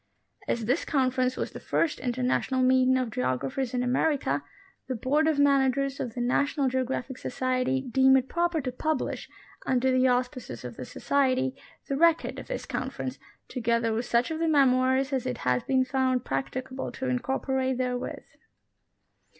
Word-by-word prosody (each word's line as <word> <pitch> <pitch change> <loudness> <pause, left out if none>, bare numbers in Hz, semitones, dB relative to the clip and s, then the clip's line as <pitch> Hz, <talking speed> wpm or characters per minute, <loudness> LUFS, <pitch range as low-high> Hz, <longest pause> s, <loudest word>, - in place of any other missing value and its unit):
As 230 -2 -1
this 255 +8 +1
Conference 255 -2 +1
was - - -3
the - - -8
first 325 - 0
international 255 +1 0
meeting 260 0 +4
of 250 -3 -1
geographers 135 - -1
in 250 - +1
America, 270 +4 +1 0.4
the 260 - -2
Board 290 +7 +1
of 315 -2 +2
Managers 275 -1 +2
of 230 - -4
the 245 - -2
National 275 +3 +1
Geographic 260 0 -2
Society 255 +1 0
deem 265 +1 +4
it 260 0 -1
proper 345 0 0
to 255 -1 -3
publish, 310 +5 -2 0.4
under 260 0 +2
the 255 0 +4
auspices 250 - -2
of 120 -2 -7
the 130 - -7
Society, 265 - 0 0.3
the 275 - -1
record 335 +1 +3
of - - -9
this - - -4
Conference, - - -4 0.3
together 235 -2 0
with 230 +2 -1
such 240 +5 +1
of 320 - -3
the 330 - +1
memoirs 265 -2 +3
as 260 -1 -1
it 250 -2 -2
has 125 - +1
been 260 -1 +2
found 260 -2 0
practicable 255 - -3
to 265 - -5
incorporate 260 +1 -1
therewith. 250 -1 -3
260 Hz, 160 wpm, -27 LUFS, 250-270 Hz, 0.4 s, meeting